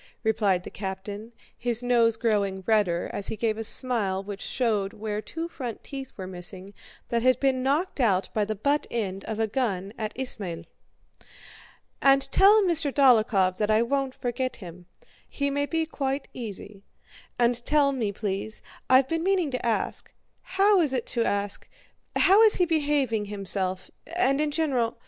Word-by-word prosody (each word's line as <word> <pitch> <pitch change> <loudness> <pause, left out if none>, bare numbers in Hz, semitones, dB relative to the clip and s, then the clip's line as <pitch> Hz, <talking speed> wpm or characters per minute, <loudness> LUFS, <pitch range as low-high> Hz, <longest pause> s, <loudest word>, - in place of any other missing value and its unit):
replied 210 -5 +1
the - - -9
captain, 200 +3 -6 0.2
his 240 0 -2
nose 235 -2 +3
growing 200 -5 0
redder 205 -6 +1
as 200 - -3
he - - -3
gave 220 0 0
a 225 - -4
smile 215 -5 +1
which 200 -1 -7
showed 215 -6 -1
where 210 0 -4
two 330 +8 -5
front 250 -9 -7
teeth 270 -2 -7
were 190 - -6
missing 185 +2 -7 0.4
that 235 -1 0
had 255 +1 +3
been 265 -2 +1
knocked 290 +6 0
out 200 -7 +2
by 215 - +1
the 215 +1 -3
butt 285 +8 0
end 195 -4 -3
of 220 -1 -4
a 225 - +2
gun 205 -4 -2
at 215 -1 -2
Ismail. 200 -10 -2 1.4
"And 275 0 +4
tell 415 +2 +6
Mr. 330 -6 +2
Dólokhov 215 -9 +4
that 210 -1 0
I 215 +1 +4
won't 270 +1 -1
forget 255 +1 -3
him—he 180 - -7
may 285 +1 -1
be 325 0 0
quite 275 -3 -3
easy. 205 -3 -8 0.6
And 240 0 +1
tell 290 +1 +3
me, 235 -7 -2
please—I've 220 +6 -1
been 330 +3 -1
meaning 365 -4 +1
to 255 - -3
ask—how 380 - 0
is 295 -5 +1 1.6
he 360 - +2
behaving 285 -9 0
himself, 195 -2 -2 0.3
and 280 -5 +2
in 305 - +1
general..." 275 -7 0
235 Hz, 150 wpm, -26 LUFS, 205-275 Hz, 1.6 s, tell